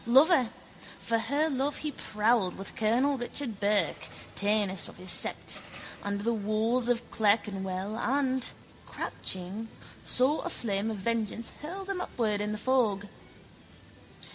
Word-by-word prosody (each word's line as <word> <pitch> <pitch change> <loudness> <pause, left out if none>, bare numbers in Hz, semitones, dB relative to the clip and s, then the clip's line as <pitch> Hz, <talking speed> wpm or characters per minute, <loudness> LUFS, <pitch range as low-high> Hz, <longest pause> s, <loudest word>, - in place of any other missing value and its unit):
Lover, 265 0 +6 0.5
for 230 0 0
her 285 +7 +1
love 280 0 -1
he 305 - -2
prowled 210 -5 +1
with 195 - -7
colonel 250 +6 +2
Richard 240 -3 -2
Burke, 205 0 +1 0.3
tanist 205 -2 +3
of - - -13
his 185 0 +3
sept, - - +1 0.4
under 205 0 -3
the 235 +1 +1
walls 220 +3 +1
of 240 -1 +1
Clerkenwell 200 -2 0
and, 260 0 +1 0.4
crouching, 190 +5 -4 0.4
saw 265 +5 +4
a 350 - -3
flame 210 - -1
of 220 - -3
vengeance 230 +2 -1
hurl 370 +6 -6
them 385 -2 -2
upward 215 - -1
in 210 0 -1
the 215 - -2
fog. 210 -4 +1
225 Hz, 135 wpm, -29 LUFS, 205-260 Hz, 0.5 s, Lover